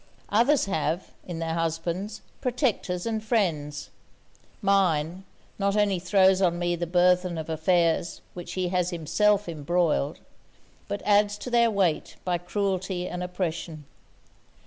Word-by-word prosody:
others 240 +7 +3
have, 165 -2 -2 0.2
in 175 -2 -5
their 165 0 -2
husbands, 170 +5 -2 0.2
protectors 235 -8 -1
and 220 -1 -2
friends; 160 -10 -1 0.7
mine, 185 -3 +1 0.3
not 200 +1 +1
only 200 -3 +2
throws 190 +1 +4
on 175 -2 +2
me 175 0 0
the 175 0 -3
burthen 180 0 +3
of 160 0 -4
affairs 170 +1 +1
which 175 - -7
he 185 -1 -1
has 180 -1 +1
himself 200 +5 +1
embroiled, 160 -2 0 0.7
but 205 0 -4
adds 205 0 +3
to 250 - -7
their 235 -1 +4
weight 190 -7 0
by 175 -1 0
cruelty 190 0 -2
and 180 - -5
oppression. 170 -4 -4
180 Hz, 130 wpm, -26 LUFS, 170-200 Hz, 0.7 s, throws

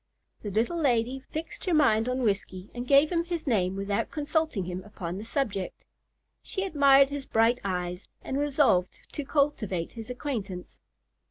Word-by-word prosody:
The 210 - -4
little 230 - 0
lady 250 -1 +1
fixed 315 +4 -7
her 360 -3 +2
mind 240 -6 +4
on 255 0 -1
Whiskey, 195 -3 -2
and 245 +1 -5
gave 280 +4 +5
him 340 -1 +1
his 340 -1 -4
name 190 -8 +1
without 200 +1 -1
consulting 300 - -1
him 180 +1 -5
upon 185 -3 -6
the - - -6
subject. 225 -6 -3 0.6
She 385 - -3
admired 275 -5 +5
his 280 -1 -5
bright 225 +2 +3
eyes, 180 -1 -3 0.2
and 270 - -2
resolved 275 -11 +3 0.2
to 295 - -4
cultivate 245 - 0
his 225 -1 -9
acquaintance. 220 -9 -5
245 Hz, 160 wpm, -28 LUFS, 195-285 Hz, 0.6 s, gave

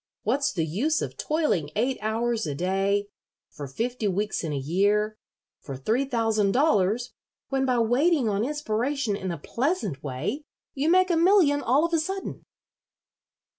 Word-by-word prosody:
What's 270 +6 +1
the 165 -4 -1
use 250 - 0
of - - -5
toiling 300 - 0
eight 250 +5 0
hours 225 0 -1
a 145 - -3
day 195 +4 0 0.5
for 145 -1 -7
fifty 230 - -2
weeks 205 +2 -1
in 160 - -3
a 145 - -2
year 205 +9 +1 0.4
for 135 -2 -7
three 225 - 0
thousand 225 -5 +1
dollars 245 -4 +2 0.4
when 270 -1 0
by 250 -1 +2
waiting 250 +4 +2
on 205 0 0
inspiration 265 -3 -1
in 190 -2 -4
a 170 - -3
pleasant 230 - -2
way 140 - -3 0.3
you 290 +3 0
make 370 +1 +4
a - - +3
million 335 -5 +4
all 275 +7 +3
of 340 - -4
a 330 - +3
sudden?" 385 +5 -4
230 Hz, 160 wpm, -26 LUFS, 195-285 Hz, 0.5 s, make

